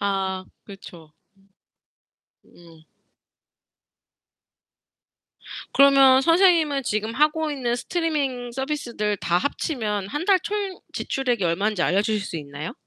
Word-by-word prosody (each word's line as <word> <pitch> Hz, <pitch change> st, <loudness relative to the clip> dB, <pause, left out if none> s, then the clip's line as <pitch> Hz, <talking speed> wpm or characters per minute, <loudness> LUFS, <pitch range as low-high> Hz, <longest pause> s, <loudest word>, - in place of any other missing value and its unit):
아 190 Hz, -2 st, -2 dB, 0.2 s
그렇죠. 170 Hz, -6 st, -13 dB, 1.3 s
음. 165 Hz, -2 st, -19 dB, 2.9 s
그러면 270 Hz, -1 st, +6 dB
선생님은 330 Hz, -4 st, +3 dB
지금 215 Hz, 0 st, -2 dB
하고 305 Hz, +2 st, +1 dB
있는 245 Hz, -4 st, -2 dB
스트리밍 275 Hz, -5 st, -2 dB
서비스들 240 Hz, -6 st, -3 dB
다 175 Hz, 0 st, 0 dB
합치면 215 Hz, -, -3 dB
1 295 Hz, +10 st, -4 dB
달 400 Hz, -, +4 dB
총 405 Hz, -2 st, -4 dB
지출액이 245 Hz, -7 st, -2 dB
얼만지 190 Hz, +3 st, 0 dB
알려 195 Hz, +4 st, +2 dB
주실 210 Hz, -1 st, -1 dB
수 170 Hz, -, -5 dB
있나요? 145 Hz, +1 st, -7 dB
240 Hz, 220 characters per minute, -23 LUFS, 195-290 Hz, 2.9 s, 그러면